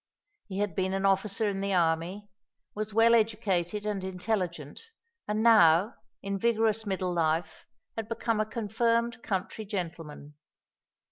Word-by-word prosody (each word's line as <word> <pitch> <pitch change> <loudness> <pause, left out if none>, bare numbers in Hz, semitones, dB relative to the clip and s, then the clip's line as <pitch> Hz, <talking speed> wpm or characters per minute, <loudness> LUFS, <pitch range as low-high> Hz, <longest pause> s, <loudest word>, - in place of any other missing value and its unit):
He 190 -2 -6
had 205 -3 -1
been 190 0 0
an 195 0 -1
officer 195 +2 +1
in 195 -1 -2
the 195 -1 -1
army, 170 +4 0 0.5
was 215 0 -4
well 225 +2 +5
educated 210 -4 +1
and 205 -3 -2
intelligent, 180 -5 -3 0.5
and 210 +1 0
now, 205 -3 +6 0.3
in 195 0 -3
vigorous 225 -1 +1
middle 185 -2 -1
life, 160 -1 -1 0.3
had 225 -1 -5
become 230 -1 -1
a 215 - +2
confirmed 230 +1 0
country 195 +2 -3
gentleman. 165 -7 -6
200 Hz, 135 wpm, -29 LUFS, 180-220 Hz, 0.5 s, now